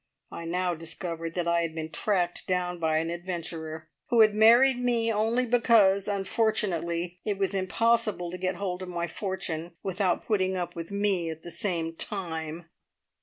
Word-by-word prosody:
I 170 - -7
now 180 +1 0
discovered 165 0 -5
that 175 -1 -1
I 170 0 +3
had 165 -1 -3
been 160 -1 -5
tracked 180 -4 0
down 180 -1 -1
by 160 -1 +1
an 165 +1 -1
adventurer, 165 -3 -5 0.2
who 235 -3 +4
had 215 -1 +6
married 240 +4 +6
me 235 -2 +1
only 225 +4 +1
because, 225 -5 +4
unfortunately, 190 -4 0
it 205 -2 -1
was 195 0 0
impossible 195 -1 +1
to 180 - -5
get 185 +1 -1
hold 185 -2 -3
of 185 - -6
my 170 -1 -2
fortune 170 -2 -4
without 190 -1 0
putting 190 -3 +1
up 175 -1 -4
with 165 -1 -6
me 200 -4 +1
at 160 0 -7
the 175 - -7
same 165 -3 -2
time." 165 -4 -4
180 Hz, 170 wpm, -28 LUFS, 170-205 Hz, 0.2 s, had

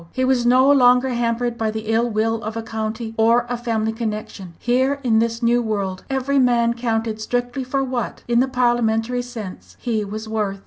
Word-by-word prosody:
He 255 - 0
was 255 -2 +2
no 255 +2 +5
longer 250 -1 +5
hampered 240 0 -1
by 220 -1 0
the 220 0 -4
ill 235 +2 +2
will 225 +1 0
of 215 +1 -5
a 225 - -3
county 220 0 -4
or 230 +2 +4
a 245 - -1
family 225 -2 -1
connection. 215 -5 -5
Here 260 +3 +1
in 225 -3 +3
this 230 +1 -1
new 240 +1 +3
world, 200 -4 -3
every 270 +1 +1
man 240 -2 +3
counted 225 -2 -2
strictly 245 +3 -2
for 270 +2 -1
what, 255 -3 -4
in 240 0 +3
the 260 - +3
parliamentary 240 -1 +1
sense, 230 -6 -9
he 225 -4 -1
was 215 +2 -6
worth. 210 -3 -2
235 Hz, 190 wpm, -21 LUFS, 220-245 Hz, -, no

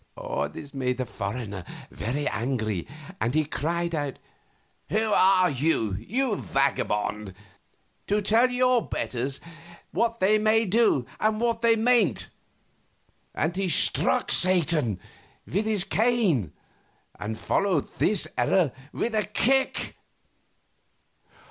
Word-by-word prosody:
This 145 -1 -10
made 125 -2 -1
the 130 - -2
foreigner 105 -2 -5 0.3
very 140 +7 -3
angry, 110 -6 -2 0.3
and 120 +5 -1
he 155 -1 +2
cried 170 +3 -2
out, 145 -4 -3 0.7
"Who 220 +1 0
are 185 -2 +4
you, 130 -7 0
you 210 - -1
vagabond, 105 -7 -1 0.7
to 205 +1 +1
tell 225 +5 +3
your 250 -1 +2
betters 130 +3 -3 0.5
what 230 +4 0
they 210 +3 +3
may 220 +1 +3
do 205 - +2
and 215 0 +1
what 230 -1 0
they 230 -1 +4
mayn't!" 225 - +2 1.1
and 160 +3 -1
he 195 -1 -1
struck 160 - +3
Satan 165 - +3 0.5
with 200 +5 -1
his 215 -4 +3
cane 200 - +1 0.7
and 110 +1 -4
followed 185 - 0
this 210 -4 +1
error 180 -8 +2 0.2
with 235 - -2
a 215 -1 +1
kick. 260 +6 0
175 Hz, 115 wpm, -26 LUFS, -, 1.1 s, are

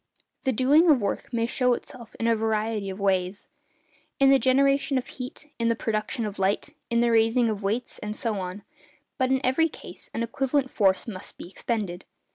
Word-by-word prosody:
The 265 - +3
doing 285 +8 +4
of 290 -5 +6
work 225 +6 -3
may 230 -2 0
show 250 +1 +2
itself 235 -3 -11
in 230 - -1
a 230 0 +4
variety 215 -2 -1
of 190 +1 -6
ways— 190 -1 0 0.7
in 275 0 +6
the 270 - +6
generation 275 +1 +3
of 255 - -2
heat, 265 +4 -8
in 230 - +1
the 230 - +2
production 220 +1 -2
of 205 -1 -6
light, 195 +2 +1 0.2
in 235 0 +2
the 235 0 +3
raising 225 +1 +3
of 210 -1 -4
weights, 215 +5 -2
and 210 0 -5
so 220 -4 -2
on; 185 +2 -6 0.6
but 260 0 +2
in 265 0 +1
every 325 +6 +3
case - - -11
an 230 - 0
equivalent 265 +3 0
force 190 -1 +2
must 195 -3 -5
be - - -8
expended. 195 -2 -3
230 Hz, 195 wpm, -26 LUFS, 210-260 Hz, 0.7 s, of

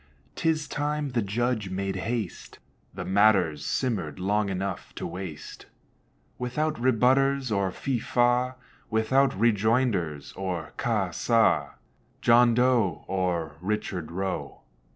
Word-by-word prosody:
'Tis 155 -2 0
time 145 0 -2
the 120 -2 +1
judge 110 0 -1
made 95 +1 -2
haste, 110 0 -4 0.3
The - - -6
matter's 95 -6 +3
simmered 105 - -2
long 100 +2 +1
enough 95 +1 -4
to - - -5
waste, 85 -3 -7 0.7
Without 150 +6 -1
rebutters 130 +2 +3
or 100 -2 +1
fi, 130 +5 -2
fa, 125 +2 +1 0.3
Without 120 +5 +3
rejoinders 110 - +1
or 90 -5 -4
ca, 105 -6 0
sa, 115 +6 +2 0.5
John 120 0 +5
Doe, 120 -8 +2
Or 85 -5 -1
Richard 95 -4 -3
Roe. 95 +2 -4
110 Hz, 110 wpm, -27 LUFS, 95-125 Hz, 0.7 s, John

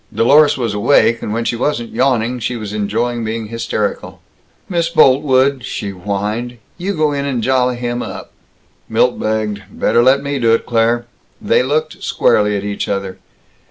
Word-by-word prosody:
Dlorus 145 +6 +4
was 115 -4 -2
awake, 115 +2 +3
and - - -4
when 115 +2 -2
she 120 - 0
wasn't 120 -1 -2
yawning, 125 -1 +1
she 120 +2 -3
was 105 -3 -6
enjoying 115 +3 -1
being 110 0 -4
hysterical. 115 -2 -3 0.5
"Miss 170 -3 0
Boltwood," 135 -3 +3
she 100 -1 -4
whined, 105 +6 -4 0.2
"you 195 +3 -2
go 155 -2 +1
in 140 -1 -2
and 130 -5 -2
jolly 125 -1 +2
him 120 0 -3
up." - - -7 0.6
Milt 120 +2 +1
begged, 110 -1 -2
"Better 120 - +1
let 135 +3 +4
me 140 -1 -2
do 115 -2 +4
it, - - -4
Claire." 120 0 +1 0.3
They - - +2
looked 155 +4 -2
squarely 105 -1 +2
at 100 - -5
each 100 0 -3
other. 100 -2 -4
120 Hz, 165 wpm, -17 LUFS, 110-130 Hz, 0.6 s, Dlorus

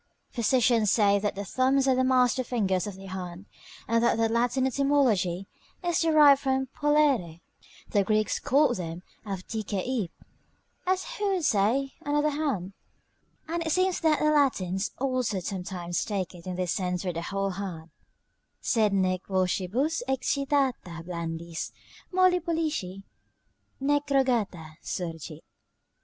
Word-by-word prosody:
Physicians 235 -2 +2
say 200 -2 +4
that 205 0 -2
the 200 +1 -5
thumbs 265 +5 +2
are 265 - +5
the 260 0 +2
master 255 0 +3
fingers 195 -7 0
of 205 - -6
the 195 0 -11
hand, 185 0 -7 0.4
and 230 +1 +2
that 235 - +3
their 225 0 +2
Latin 245 +3 +1
etymology 250 -10 +1 0.4
is 345 -1 +1
derived 300 -4 +6
from 265 -1 0
"pollere." 285 - +2 0.5
The 205 - +3
Greeks 215 +2 +1
called 280 -2 +3
them 170 0 -6 0.2
'Avtixeip', 205 +2 -3 0.8
as 370 0 +1
who 415 -6 -1
should 350 -4 -1
say, 245 +6 +2
another 295 +1 +1
hand. 270 - -2 0.7
And 335 +1 -2
it 320 - -2
seems 370 +2 +2
that 315 -2 +3
the 305 - +2
Latins 200 -10 +1
also 255 -6 0
sometimes 180 -1 -3
take 195 -5 -3
it 175 0 -12
in 180 - -3
this 180 -1 -1
sense 180 -2 -1
for 180 -2 -2
the 165 - -3
whole 195 +3 -2
hand: 180 -4 -6 0.7
"Sed 215 -4 +2
nec 185 -1 0
vocibus 195 - 0
excitata 265 - 0
blandis, 170 -1 -5 0.4
Molli 370 -1 +4
pollici 310 - -2 0.8
nec 290 +1 +1
rogata, 225 - 0
surgit." 165 -3 -5
225 Hz, 135 wpm, -27 LUFS, 185-275 Hz, 0.8 s, derived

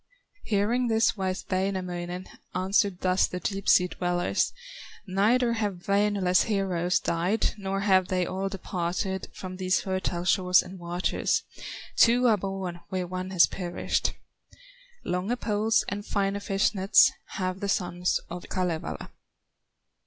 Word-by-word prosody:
Hearing 225 +4 +1
this 225 0 +2
wise 190 -2 -3
Wainamoinen 185 -1 -2 0.3
Answered 190 0 +1
thus 185 0 +3
the 180 - -5
deep 195 +1 -2
sea 180 - +6
dwellers: 175 0 0 0.5
"Neither 225 +6 +2
have 205 -6 -3
Wainola's 200 -2 +3
heroes 180 -4 0
Died, 180 +7 0
nor 195 0 -2
have 190 -2 +3
they 185 -1 0
all 190 +2 -3
departed 190 0 -3
From 185 -1 -8
these 185 -1 +1
fertile 185 -2 -2
shores 180 0 +4
and 185 +1 -10
waters, 175 +1 -1 0.5
Two 245 +2 +5
are 225 -3 +5
born 190 -2 -4
where 185 -2 -2
one 185 +1 -5
has 185 -3 +6
perished; 175 -2 -2 0.9
Longer 185 +7 -1
poles 220 -1 +1
and 205 0 -4
finer 200 -1 -1
fish 200 +1 +1
nets 195 0 +5 0.2
Have 185 0 -2
the 200 0 -3
sons 180 -2 0
of 175 +1 -8
Kalevala!" 180 -4 -3
190 Hz, 130 wpm, -27 LUFS, 180-200 Hz, 0.9 s, sea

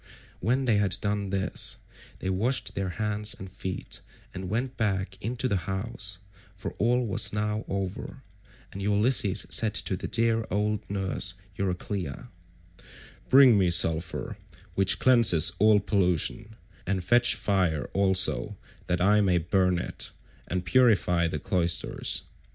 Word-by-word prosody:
When 130 +3 0
they 115 -4 +3
had 100 -2 +1
done 100 -1 -2
this 95 -1 -2 0.4
they 95 - -4
washed 115 +8 -1
their 95 -1 -3
hands 105 0 -1
and 95 -1 -9
feet 95 -1 -6 0.3
and 95 -1 -6
went 120 +5 -2
back 95 -3 -1
into 125 +4 -2
the 95 -6 -2
house, 95 -1 -1 0.4
for 95 - -6
all 120 +2 +2
was 100 -4 +1
now 105 +1 -2
over; 100 +7 -5 0.5
and 100 - -6
Ulysses 105 0 +2
said 110 -2 +3
to 95 - -2
the - - -5
dear 115 0 +1
old 105 +2 -2
nurse 95 -1 -2 0.2
Euryclea, 95 - -4 1.0
"Bring 130 -5 +7
me 90 -2 +3
sulphur, 80 -1 +1 0.4
which 95 +1 +2
cleanses 115 - +5
all 105 0 +5
pollution, 100 +2 -1 0.3
and 95 0 -1
fetch 120 +5 +4
fire 90 -7 0
also 95 +1 +2 0.3
that 90 -1 -1
I 105 +3 +4
may 95 -3 +2
burn 90 +2 +1
it, 90 - -3 0.4
and 90 0 -3
purify 90 -7 +3
the 80 - -3
cloisters. 85 +3 0
100 Hz, 135 wpm, -27 LUFS, 90-110 Hz, 1.0 s, Bring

